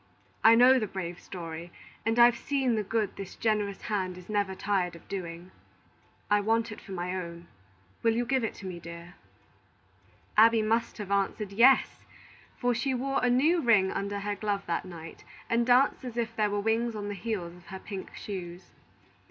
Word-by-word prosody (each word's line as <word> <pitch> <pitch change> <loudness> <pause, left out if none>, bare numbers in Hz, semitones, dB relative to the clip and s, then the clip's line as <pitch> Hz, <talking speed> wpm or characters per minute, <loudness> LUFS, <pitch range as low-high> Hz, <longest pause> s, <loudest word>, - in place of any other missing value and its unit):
I 225 +1 +8
know 255 +2 +7
the 215 - -2
brave 180 -2 -5
story, 170 -1 -8 0.4
and 225 +1 +1
I've 240 0 +7
seen 270 -3 0
the 215 - +1
good 210 0 -2
this 195 -2 -7
generous 210 -3 -1
hand 185 -4 -2
is 180 +1 -13
never 200 -2 0
tired 190 -3 -1
of 170 - -15
doing. 180 -2 -6 0.8
I 205 0 +3
want 225 +2 +1
it 210 - -9
for 195 - -12
my 180 0 -3
own. 170 -2 -6 0.6
Will 225 -1 +2
you 240 +1 0
give 265 -1 +1
it 225 - -2
to 195 - -10
me, 180 -2 -5
dear?" 170 +1 -10 1.2
Abby 225 +1 +6
must 225 +2 0
have 205 -3 -6
answered, 200 +1 0
"Yes;" 250 +6 +4 0.5
for 245 0 +1
she 255 +3 -1
wore 270 +2 -1
a 250 - +4
new 305 +8 +3
ring 210 -7 +4
under 200 0 -3
her 205 +1 -2
glove 205 -1 -2
that 170 +1 -2
night, 165 -3 -10 0.2
and 235 +1 +1
danced 255 +2 +4
as 245 -2 -7
if 230 -1 -2
there 215 -1 +1
were 205 0 -1
wings 225 +2 0
on 205 -1 -4
the 205 - -3
heels 195 -4 -4
of 180 -1 -18
her 190 - -7
pink 190 0 -8
shoes. 180 -3 -7
205 Hz, 190 wpm, -29 LUFS, 185-230 Hz, 1.2 s, I